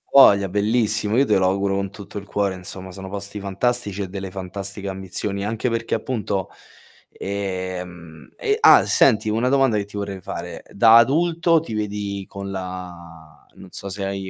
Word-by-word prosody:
Voglia, 100 -8 +6
bellissimo. 105 +1 +1
Io 135 +3 +4
te 105 - +3
lo 95 - +2
auguro 95 +1 0
con 100 0 -2
tutto 100 +1 -10
il 100 - -6
cuore 100 -1 -1
insomma, 95 +1 -8
sono 95 +1 -8
posti 100 +1 -4
fantastici 100 +1 0
e 95 - -3
delle 95 0 -6
fantastiche 100 +1 -4
ambizioni, 95 +1 -3
anche 110 +3 -1
perché 115 0 -1
appunto, 105 -5 -3 0.6
ehm, 90 -4 -6
e 425 -3 0
ah, 440 - +7
senti, 110 -4 +4
una 115 +4 +1
domanda 135 -4 +3
che 100 - -2
ti 100 - -14
vorrei 100 -1 -4
fare: - - -7
da 115 +2 +6
adulto 165 +6 +3
ti 150 - -7
vedi 100 -2 -3
con 100 0 -7
la 85 -4 -8 0.2
non 95 - -13
so 100 - -6
se 100 +1 -4
hai 95 -1 -4
100 Hz, 170 wpm, -22 LUFS, 95-110 Hz, 0.6 s, ah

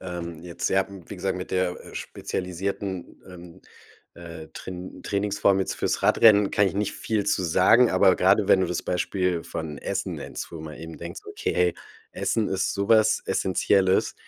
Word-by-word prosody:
ähm, 85 -2 -6
jetzt 85 -1 -3
ja 95 0 +2
wie 95 -4 -10
gesagt, 95 -1 -2
mit 90 - -6
der, 90 -1 -1
äh, - - -13
spezialisierten, 95 0 -5
ähm, 90 0 -13 0.5
äh, 85 -2 -10
Train 90 0 -8
Trainingsform 100 -1 +1
jetzt 95 - -1
fürs - - -1
Radrennen, 105 -3 +5
kann 100 -1 +3
ich 95 - -2
nicht 100 0 -1
viel 110 -3 -2
zu 100 -2 +1
sagen, 95 +8 +5
aber 95 0 +4
grade, 100 +2 +3
wenn 95 - +6
du 95 - +1
das 90 - -3
Beispiel 90 -1 -1
von 75 -3 -6
Essen - - -3
nennst, - - -7
wo 80 - -7
man 75 -1 -8
eben 80 0 -9
denkst: - - -7
„Okay, - - -3
hey, 90 -1 +2 0.4
Essen 110 -2 -1
ist 95 0 0
so 100 +2 -2
was 110 -1 +4
Essenzielles, 95 0 +2
95 Hz, 175 wpm, -25 LUFS, 90-100 Hz, 0.5 s, wenn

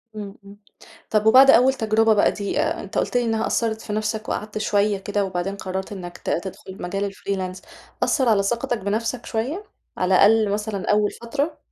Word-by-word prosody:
إمم، 205 -2 -7
إمم، 200 +1 -13 0.5
طَب 215 -1 +1
وبعد 260 +5 +8
أول 260 +2 +5
تجربة 220 -2 +2
بقى 205 - +3
دي 200 -1 -3
آآ، - - -2
أنت - - -6
قُلت - - 0
لي 245 - +2
إنها 225 -1 0
أثّرت 225 -1 -1
في 210 - -6
نفْسك 215 +1 -2
وقعَدت 210 0 -4
شوية 205 -1 +1
كده 205 +1 -2
وبعدين 190 +1 -3
قررت 190 +1 -5
إنّك 175 -3 -7
ت - - -6
تدخل 190 +1 -5
مجال 195 +3 -2
الfreelance 185 -2 -4 0.4
أثّر 260 -5 +2
على 205 -3 +3
ثقتك 235 +3 -1
بنفْسك 220 +4 -2
شوية 265 - -3 0.3
على 185 +1 +2
الأقل 215 +2 +5
مثلًا 210 -1 -2
أول 210 0 +2
فترة؟ 285 +6 -3
210 Hz, 185 wpm, -22 LUFS, 195-225 Hz, 0.5 s, وبعد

